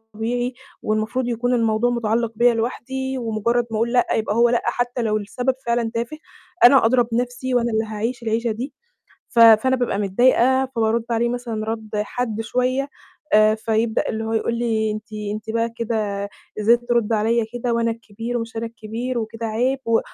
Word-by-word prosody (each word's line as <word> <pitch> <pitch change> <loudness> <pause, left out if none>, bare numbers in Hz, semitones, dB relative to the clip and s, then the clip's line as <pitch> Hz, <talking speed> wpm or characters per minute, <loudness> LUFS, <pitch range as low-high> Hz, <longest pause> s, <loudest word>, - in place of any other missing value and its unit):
طبيعي 245 +3 -2 0.3
والمفروض 215 +4 -1
يكون 245 +1 0
الموضوع 230 0 +2
مُتعلِّق 230 -1 0
بيّا 240 +1 +4
لوحدي 265 +3 -3
ومُجرّد 235 +1 0
ما 215 - -1
أقول 235 +2 0
لأ، 245 - +3
يبقى 215 -1 -1
هو 235 0 +5
لأ، 240 - +2
حتّى 245 +1 -1
لو 215 -2 +1
السبب 245 +5 -1
فعلًا 235 -1 0
تافه، 235 +6 -3 0.5
أنا 250 -1 +8
أدرَى 245 0 +4
نَفْسي 245 +2 -2
وأنا 240 -1 +2
اللي 220 0 +1
هاعيش 225 +3 -4
العيشة 225 +1 0
دي، 255 +6 -5 0.6
ف 235 - 0
فأنا 230 +3 +7
بابقى 245 -5 -1
متضايقة، 250 +6 +3
فبارُد 225 0 +1
عليه 235 +1 +1
مثلًا 235 -3 -3
رَد 220 -1 -4
حاد 220 +1 -2
شوية، 255 +4 -1 0.4
آآ 215 0 +6
فيبدأ 220 +1 0
اللي 220 0 -3
هو 225 0 -3
يقول 230 +1 0
لي: 220 -2 0
"أنتِ 215 +1 -7 0.2
أنتِ 215 +1 -7
بقى 230 +1 0
كده 210 -4 -2 0.3
إزاي 230 +3 +5
ترُدّي 235 -2 0
عليّا 225 +2 +1
كده 245 0 -1
وأنا 230 0 +1
الكبير 230 +1 -5
ومش 230 -1 -6
أنا 225 - -2
الكبير 230 +2 -4
وكده 230 +1 -5
عيب." 245 +5 0
و 230 0 +3
230 Hz, 175 wpm, -22 LUFS, 220-245 Hz, 0.6 s, أنا